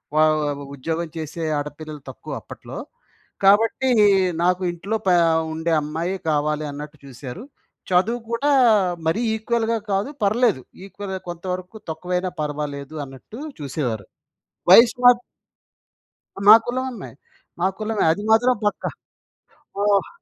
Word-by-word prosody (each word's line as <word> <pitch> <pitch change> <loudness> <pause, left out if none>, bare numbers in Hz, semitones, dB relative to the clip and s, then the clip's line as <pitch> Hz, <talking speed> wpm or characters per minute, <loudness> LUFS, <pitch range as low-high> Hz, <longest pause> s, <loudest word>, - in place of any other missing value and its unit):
వ - - +1 0.6
ఉద్యోగం 165 +5 -3
చేసే 160 +1 -5 0.2
ఆడపిల్లలు 150 0 -7
తక్కువ - - -9
అప్పట్లో. - - -10 0.7
కాబట్టి 225 +6 +4 0.5
నాకు 180 +1 +2
ఇంట్లో 195 +6 -3
పే 180 - +5 0.4
ఉండే 160 +1 -1
అమ్మాయే 165 +5 -3
కావాలి 150 0 0
అన్నట్టు 150 +1 -8
చూసారు. 130 - -8 0.5
చదువు 210 +7 +2
కూడా 255 +5 +1 0.6
మరీ 165 +8 +1
ఈక్వల్‌గా 230 0 0
కాదు, 195 +7 0
పర్లేదు 210 - +2 0.2
ఈక్వల్‌గా 195 -1 -6
కొంతవరకు 180 +3 -5
తక్కువైనా 180 +3 -2
పర్వాలేదు 150 0 -4
అన్నట్టు 135 - -12 0.2
చూసేవారు. 125 - -3 0.7
వయసు‌మ 245 +4 +7 1.4
మా 215 - +13
కులం 255 +2 -2
అమ్మాయి. 220 - -9 0.5
మా 180 - +3
కులమే, 215 -1 -1
అది 205 - -4
మాత్రం 245 +3 +5
పక్కా. 205 - -1 0.9
ఓహ్! 205 -1 +2
180 Hz, 110 wpm, -22 LUFS, 150-220 Hz, 1.4 s, మా